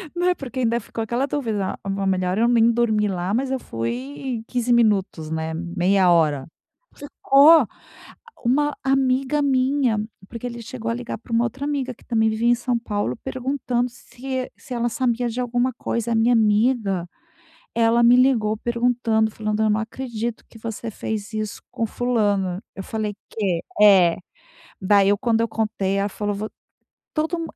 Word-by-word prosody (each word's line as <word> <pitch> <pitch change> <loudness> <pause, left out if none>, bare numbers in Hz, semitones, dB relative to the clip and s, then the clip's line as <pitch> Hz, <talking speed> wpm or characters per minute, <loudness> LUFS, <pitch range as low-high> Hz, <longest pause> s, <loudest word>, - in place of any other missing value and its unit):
Né, 355 +1 +2
porque 265 -3 -6
ainda 235 -1 +1
ficou 225 0 -5
aquela 240 +4 -1
dúvida: 225 -9 -2
"Ah, 195 - -5
não. 195 0 -2
Melhor 185 0 0
eu 230 +2 +3
nem 235 -1 +4
dormi 220 -3 +1
lá." 185 0 -2
Mas 260 +3 0
eu 265 - -1
fui 135 - -4
15 245 -1 -1
minutos, 200 -8 +1
né, 160 0 -3
meia 180 +2 +2
hora. 150 -5 +2 0.5
Ficou 285 0 +5 0.8
Uma 290 +4 +2
amiga 270 +1 +2
minha, 265 -3 +2 0.3
porque 235 +1 -7
ele 235 -1 -6
chegou 230 0 -5
a 230 - 0
ligar 245 0 -5
para 230 - -13
uma 230 +1 +3
outra 265 +4 -4
amiga 275 -4 -2
que - - -23
também 220 -2 +2
vivia 220 +2 0
em 240 - +6
São 240 0 -1
Paulo 205 - -2
perguntando 255 -2 -1
se 260 +1 -6
se 255 - -8
ela 240 0 0
sabia 245 0 0
de 240 +3 -3
alguma 245 +1 0
coisa, 235 0 -2
a - - +2
minha 225 +2 +3
amiga, 210 -4 +2 0.7
ela 230 0 +3
me 240 +1 +7
ligou 245 -4 +3
perguntando, 235 -1 +1
falando: 215 0 -2
"Eu 215 - +2
não 210 +1 +2
acredito 235 -1 -5
que - - -14
você 225 +1 -5
fez 215 0 -5
isso 215 -1 -4
com 230 - -1
fulana." 205 -6 0
Eu 195 - -5
falei 215 -1 -3 0.2
"Quê?" 190 -6 -1 0.2
É 190 -5 +7 0.7
daí, 195 +1 +4
eu 205 - +3
quando 230 0 +1
eu 230 - +1
contei, 215 -3 -1
ela 200 +1 0
falou: 205 +1 -3 0.6
"Todo 325 +2 -1
230 Hz, 170 wpm, -22 LUFS, 205-250 Hz, 0.8 s, me